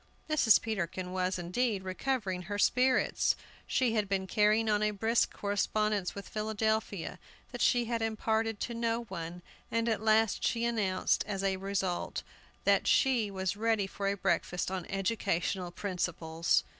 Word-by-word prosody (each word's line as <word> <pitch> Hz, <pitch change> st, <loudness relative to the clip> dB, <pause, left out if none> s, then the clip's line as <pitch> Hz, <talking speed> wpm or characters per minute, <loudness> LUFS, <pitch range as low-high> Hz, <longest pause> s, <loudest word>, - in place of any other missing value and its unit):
Mrs. 305 Hz, -8 st, +5 dB
Peterkin 185 Hz, -4 st, -3 dB
was, 185 Hz, 0 st, 0 dB
indeed, 190 Hz, +4 st, -1 dB
recovering 190 Hz, -1 st, -2 dB
her 205 Hz, +3 st, -4 dB
spirits. 255 Hz, +5 st, +3 dB, 0.3 s
She 250 Hz, -3 st, +2 dB
had 210 Hz, -3 st, 0 dB
been 195 Hz, -1 st, 0 dB
carrying 215 Hz, +3 st, +3 dB
on 210 Hz, -1 st, +2 dB
a 215 Hz, -, +3 dB
brisk 220 Hz, +3 st, +1 dB
correspondence 205 Hz, -1 st, 0 dB
with 200 Hz, -1 st, -7 dB
Philadelphia, 220 Hz, -3 st, -2 dB, 0.3 s
that -, -, -6 dB
she 245 Hz, -1 st, +3 dB
had 230 Hz, 0 st, -2 dB
imparted 225 Hz, 0 st, 0 dB
to 240 Hz, -, -2 dB
no 230 Hz, 0 st, -1 dB
one, 175 Hz, -4 st, -7 dB, 0.3 s
and 230 Hz, 0 st, 0 dB
at 220 Hz, -2 st, 0 dB
last 220 Hz, -1 st, +3 dB
she 235 Hz, 0 st, +1 dB
announced, 205 Hz, -6 st, +1 dB
as 195 Hz, -2 st, -3 dB
its 190 Hz, -1 st, 0 dB
result, 195 Hz, -2 st, -2 dB, 0.4 s
that -, -, +3 dB
she 245 Hz, -6 st, +3 dB
was 190 Hz, -1 st, -2 dB
ready 220 Hz, -1 st, +1 dB
for 195 Hz, +1 st, -4 dB
a 200 Hz, 0 st, 0 dB
breakfast 180 Hz, -1 st, 0 dB
on 185 Hz, -2 st, -4 dB
educational 195 Hz, -2 st, -1 dB
principles. 175 Hz, -3 st, 0 dB
205 Hz, 150 wpm, -31 LUFS, 185-225 Hz, 0.4 s, Mrs